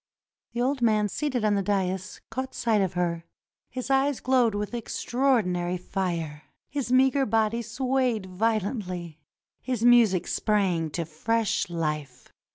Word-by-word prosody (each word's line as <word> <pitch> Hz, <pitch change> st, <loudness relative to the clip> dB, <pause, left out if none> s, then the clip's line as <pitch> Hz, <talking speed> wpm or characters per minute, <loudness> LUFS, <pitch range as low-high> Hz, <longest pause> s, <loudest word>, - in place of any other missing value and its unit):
The 240 Hz, -, -1 dB
old 265 Hz, 0 st, 0 dB
man 215 Hz, -3 st, +3 dB
seated 255 Hz, -1 st, -1 dB
on 210 Hz, -, +3 dB
the 200 Hz, -, +1 dB
dais 190 Hz, -1 st, -2 dB
caught 260 Hz, +3 st, -4 dB
sight 225 Hz, -3 st, +2 dB
of 190 Hz, -2 st, 0 dB
her. 170 Hz, -2 st, -1 dB, 0.5 s
His 255 Hz, +1 st, -4 dB
eyes 270 Hz, 0 st, +2 dB
glowed 245 Hz, -4 st, +2 dB
with 210 Hz, +2 st, -3 dB
extraordinary 220 Hz, -7 st, 0 dB
fire; 170 Hz, -5 st, -3 dB, 0.3 s
his 275 Hz, -4 st, -2 dB
meager 265 Hz, +2 st, +4 dB
body 225 Hz, +1 st, +1 dB
swayed 250 Hz, -2 st, 0 dB
violently; 185 Hz, -, -2 dB, 0.4 s
his 245 Hz, -3 st, -1 dB
music 230 Hz, -7 st, +5 dB
sprang 190 Hz, -7 st, +1 dB
to 165 Hz, +2 st, -3 dB
fresh 210 Hz, +7 st, 0 dB
life. 150 Hz, -6 st, -4 dB
210 Hz, 135 wpm, -26 LUFS, 180-245 Hz, 0.5 s, music